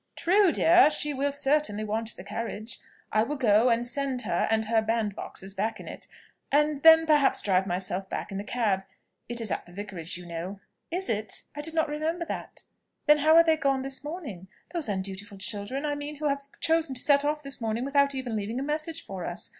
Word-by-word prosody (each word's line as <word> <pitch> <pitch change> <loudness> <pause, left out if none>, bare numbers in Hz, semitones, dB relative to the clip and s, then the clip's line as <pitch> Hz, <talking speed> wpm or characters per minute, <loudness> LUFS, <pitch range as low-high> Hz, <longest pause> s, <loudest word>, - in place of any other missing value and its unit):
"True, 380 +1 +4
dear, 345 +1 +6
she 300 -1 +1
will 280 +1 0
certainly 280 -6 +1
want 220 +1 -1
the - - -10
carriage: 220 +2 -5 0.3
I 215 - +3
will 280 +7 -1
go, 230 -2 +4
and 235 0 +1
send 255 0 -1
her - - 0
and 220 0 +1
her 225 0 +2
bandboxes 210 -3 -3
back 220 +3 -2
in - - -10
it - - -8 0.4
and 295 0 +2
then, 320 +2 +8
perhaps, 300 -3 +3
drive 190 -1 +2
myself 185 +1 -2
back - - -4
in 195 - -4
the - - -4
cab. 210 -4 0 0.5
It 240 0 -3
is 225 -3 -2
at - - -3
the - - -14
Vicarage, 180 -4 -5
you 180 - -10
know." 175 +4 -6 0.3
"Is 365 +3 -2
it? 215 -2 -2
I 295 - -4
did 325 +2 -2
not 320 0 +2
remember 315 +3 -2
that. - - -6 0.4
Then 300 0 +6
how 310 +2 +5
are 335 - +9
they 320 -1 +3
gone 275 -3 +1
this 270 0 -2
morning? 290 - -7 0.3
those 325 -9 -1
undutiful 195 +1 -4
children, 205 +8 -1
I 295 - 0
mean, 290 +1 -5
who 300 +1 -2
have 280 0 -2
chosen 325 -4 +1
to 245 - 0
set 285 -1 +4
off 300 +1 -1
this 275 -2 -5
morning 225 +2 -1
without 280 0 +2
even 255 -4 -3
leaving 215 +4 -3
a - - -2
message 310 +3 -2
for 190 -2 -6
us. 175 - -5
255 Hz, 215 wpm, -27 LUFS, 210-300 Hz, 0.5 s, are